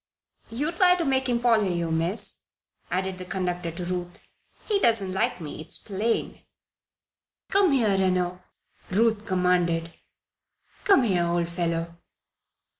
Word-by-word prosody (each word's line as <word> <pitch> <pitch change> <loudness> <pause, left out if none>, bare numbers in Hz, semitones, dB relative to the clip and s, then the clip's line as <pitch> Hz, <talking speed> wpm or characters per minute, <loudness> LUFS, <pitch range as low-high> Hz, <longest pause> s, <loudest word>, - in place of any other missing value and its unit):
"You 280 +8 -2
try 360 +1 +5
to 345 -2 -2
make 265 -1 +1
him 240 -1 +1
follow 225 -5 +3
you, 170 -2 -1
Miss," 165 +6 -1 0.4
added 185 0 -2
the 185 - -6
conductor 180 -2 -2
to 170 +2 -6
Ruth. 175 0 -4 0.5
"He 415 -2 +2
doesn't 220 - +2
like 190 -1 0
me, 155 -1 -6
it's - - -7
plain." 215 +3 -2 1.1
"Come 390 -4 +4
here, 225 -7 +3
Reno!" 180 -1 0 0.5
Ruth 220 +2 +1
commanded. 175 -3 +1 0.9
"Come 390 -10 +5
here, 180 -6 +2
old 170 0 0
fellow." 170 -1 -2
185 Hz, 130 wpm, -26 LUFS, 175-230 Hz, 1.1 s, try